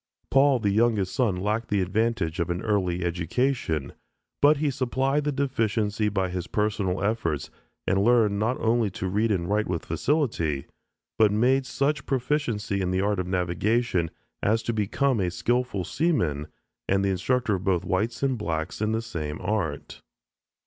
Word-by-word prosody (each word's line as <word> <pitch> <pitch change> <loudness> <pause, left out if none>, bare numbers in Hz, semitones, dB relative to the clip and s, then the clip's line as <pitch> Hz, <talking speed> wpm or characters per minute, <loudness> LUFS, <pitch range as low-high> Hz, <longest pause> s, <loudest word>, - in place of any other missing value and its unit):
Paul, 135 0 +5
the 105 -4 0
youngest 110 -3 +2
son, 115 -8 +1
lacked 105 +5 -1
the 105 - +1
advantage 100 -3 -1
of 85 0 0
an 85 0 -2
early 90 -5 0
education, 85 - -1 0.5
but 145 +1 +6
he 145 0 0
supplied 135 +3 0
the 150 - +1
deficiency 110 -6 0
by 95 -2 -1
his 90 -1 -4
personal 100 -3 -1
efforts 100 -9 -1 0.3
and 95 +2 +2
learned 110 -3 +3
not 115 +4 0
only 115 -1 +2
to 95 - -2
read 105 +4 +1
and 90 -4 0
write 105 +2 +1
with 85 -2 -3
facility, 85 - 0 0.5
but 110 -2 +5
made 130 +5 +2
such 140 +1 -1
proficiency 120 -7 -1
in 90 - 0
the 95 +1 +1
art 100 -1 0
of 90 - -2
navigation 90 +1 0 0.3
as 110 +2 +1
to 115 - -1
become 115 +4 +1
a 90 -2 +1
skillful 120 +1 -1
seaman 90 - 0 0.4
and 95 0 +2
the - - +2
instructor 110 +5 0
of 95 -1 -2
both 90 -3 +1
whites 110 +8 -1
and 130 -4 +1
blacks 80 -2 -3
in 110 0 +1
the 115 +1 -1
same 80 -9 -5
art. 85 -9 -3
105 Hz, 165 wpm, -26 LUFS, 90-120 Hz, 0.5 s, but